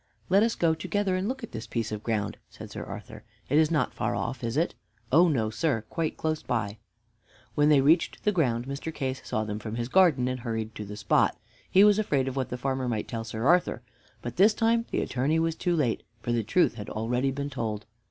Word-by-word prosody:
"Let 195 +3 +5
us 230 +1 +2
go 165 -2 +2
together 190 +4 -1
and 185 +2 -1
look 265 -1 -4
at 230 - -7
this 110 0 -6
piece 115 -2 -2
of 105 -1 -4
ground," 105 -2 -2
said - - -11
Sir - - -5
Arthur. - - -9 0.3
"It 145 +3 +4
is 155 -1 +4
not 160 -3 +1
far 110 +3 -1
off, 120 +1 -3
is 115 +3 -2
it?" 165 +3 +1 0.4
"Oh, 170 +6 +6
no, 115 -9 +1
sir, 115 0 0
close 160 -1 -1
by." 105 -3 -2 0.7
When 150 0 +3
they 145 -3 +6
reached 160 +5 +2
the 210 - +3
ground, 125 - +1
Mr. 140 +4 -4
Case 130 -3 -3
saw 110 - -1
them 105 -1 -4
from 110 0 -5
his 120 +1 -3
garden 155 -8 +4
and 130 0 -2
hurried 110 -2 -3
to 105 - -6
the 105 +1 -8
spot. 105 - +2 0.3
He 195 - +6
was 210 0 +6
afraid 140 -11 +1
of 135 - -3
what 130 -2 -1
the 125 - -4
farmer 130 0 -1
might 110 -3 -2
tell 115 -2 -4
Sir 110 +1 -4
Arthur. 175 +4 +3 0.4
But 120 - -6
this 210 +4 +6
time 230 +1 +2
the - - 0
Attorney 135 +6 0
was 165 0 +1
too 175 0 0
late, 135 -8 +1 0.2
for 120 - -1
the 120 -1 +2
truth 110 - +2
had 105 -3 -7
already 125 +5 0
been 140 +1 -4
told. 110 -5 -3
130 Hz, 230 wpm, -27 LUFS, 115-165 Hz, 0.7 s, Oh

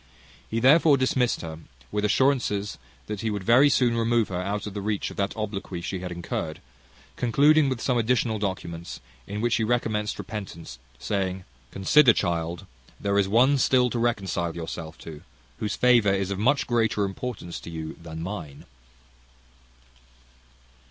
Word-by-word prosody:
He 115 - -1
therefore 145 +4 +6
dismissed 130 -2 +1
her 80 -1 -7 0.3
with 105 0 -1
assurances 105 -3 +1 0.3
that 105 -2 -5
he 115 - -1
would 105 -2 -3
very 125 +8 +6
soon 125 -4 +2
remove 115 -1 +1
her 90 -1 -2
out 100 +2 -3
of 105 - -6
the 100 - -4
reach 105 0 -2
of - - -12
that 100 +2 -2
obloquy 100 -4 -4
she 90 +2 -4
had 90 0 -6
incurred; 85 -2 -4 0.6
concluding 140 +5 +4
with 130 -3 -2
some 125 +1 +1
additional 115 -1 +1
documents, 85 -4 -4 0.3
in 105 +1 -4
which 120 0 +2
he 115 - 0
recommended 110 -2 -1
repentance, 95 - -7 0.2
saying, 95 +1 -2 0.3
"Consider, 120 - +5
child, 85 -2 -2 0.3
there 100 0 +1
is 100 - +2
one 130 +7 +4
still 125 -1 +3
to 120 - -1
reconcile 95 -7 -1
yourself 80 -1 -6
to, 80 -2 -9 0.4
whose 105 -2 -2
favour 120 -5 +4
is 95 0 -1
of 100 - -3
much 135 +7 +2
greater 110 -4 +1
importance 95 -2 -5
to - - -10
you 80 -1 -6
than 80 -1 -7
mine." 80 -7 -7
105 Hz, 160 wpm, -25 LUFS, 90-120 Hz, 0.6 s, therefore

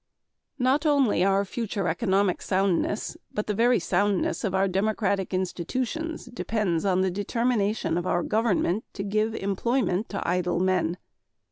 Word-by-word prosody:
Not 265 +3 +2
only 270 - +3
our 195 +1 +2
future 205 -2 -3
economic 190 +1 +1
soundness 195 +1 0
but 210 - -2
the 210 - -1
very 235 +3 +3
soundness 200 -4 0
of 195 -4 -1
our 190 +1 +3
democratic 195 0 0
institutions 250 - -3
depends 215 -7 -1
on 185 -1 +2
the 190 -1 +1
determination 205 -3 0
of 175 - -4
our 175 -1 +1
government 215 -2 +1
to 195 - -4
give 215 +2 0
employment 200 +1 0
to 200 - -4
idle 180 0 0
men. 185 -2 +1
200 Hz, 140 wpm, -26 LUFS, 185-225 Hz, -, only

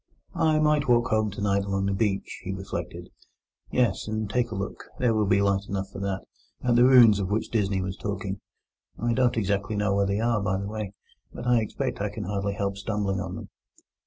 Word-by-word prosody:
"I 155 -1 +2
might 150 -1 +2
walk 120 0 +4
home 110 -2 +2
tonight 100 0 0
along 95 0 -1
the 100 - 0
beach," 100 -1 -1
he 95 - -4
reflected—"yes, 95 +3 -4
and 110 0 -2
take 120 +3 0
a 110 - -5
look—there 105 +4 -2
will 105 -2 +1
be 100 +1 +3
light 100 0 +1
enough 100 -1 -3
for - - -7
that—at 100 +5 -3
the 120 +1 +6
ruins 120 -5 +7
of 95 -2 -2
which 105 +2 -1
Disney 100 -4 +1
was 95 0 -4
talking. 100 -2 -4 0.6
I 120 +1 +1
don't 125 -1 +2
exactly 100 0 0
know 105 -1 +1
where 100 0 +2
they 100 +1 0
are, 115 -1 +1
by 95 -1 0
the 100 - -4
way; 105 -2 -5 0.4
but 120 - -8
I 125 -2 +4
expect 110 - -3
I 105 - 0
can 105 +1 -6
hardly 100 +1 -2
help 100 -1 -2
stumbling 100 -1 -1
on 90 -1 -4
them." - - -8
100 Hz, 200 wpm, -26 LUFS, 100-115 Hz, 0.6 s, ruins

